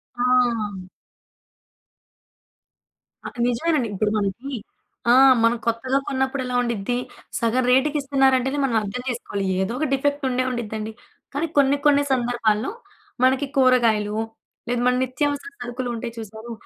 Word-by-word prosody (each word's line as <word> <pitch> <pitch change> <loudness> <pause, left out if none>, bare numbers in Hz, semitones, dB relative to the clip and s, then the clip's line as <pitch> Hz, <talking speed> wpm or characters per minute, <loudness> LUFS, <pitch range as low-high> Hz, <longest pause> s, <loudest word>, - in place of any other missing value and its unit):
ఆ! 240 -5 +1 2.5
ఆ! - - -4 0.2
నిజమేనండి. 250 0 0
ఇప్పుడు 210 +2 0
మనకి 210 +7 -3 0.6
ఆ! - - +7 0.3
మనం 230 +1 +3
కొత్తగా 245 +4 +1
కొన్నప్పుడు 265 0 -1
ఎలా 250 0 -3
ఉండిద్ది. 235 0 -1 0.4
సగం 235 +2 +1
రేటుకి 285 +4 +3
ఇస్తున్నారంటేనే 270 -1 +2
మనం 245 -4 -1
అర్థం 210 +4 -4
జేసుకోవాలి. 220 -5 -3 0.2
ఏదో 190 +4 -1
ఒక 310 - +1
డిఫెక్ట్ 285 +1 0
ఉండే 255 0 0
ఉండిద్దండి. 220 -3 -4 0.4
కానీ 295 +4 -1
కొన్ని, 280 0 +4
కొన్ని 285 -1 +5
సందర్భాల్లో 240 - 0 0.5
మనకి 260 +2 +3
కూరగాయలు, 230 -6 +3 0.5
లేదా 245 0 0
మన 250 - +3
నిత్యావసర 285 +8 -2
సరుకులు 245 +1 -4
ఉంటాయి 230 0 -5
చూసారు 220 +1 -8
245 Hz, 120 wpm, -23 LUFS, 230-270 Hz, 2.5 s, ఆ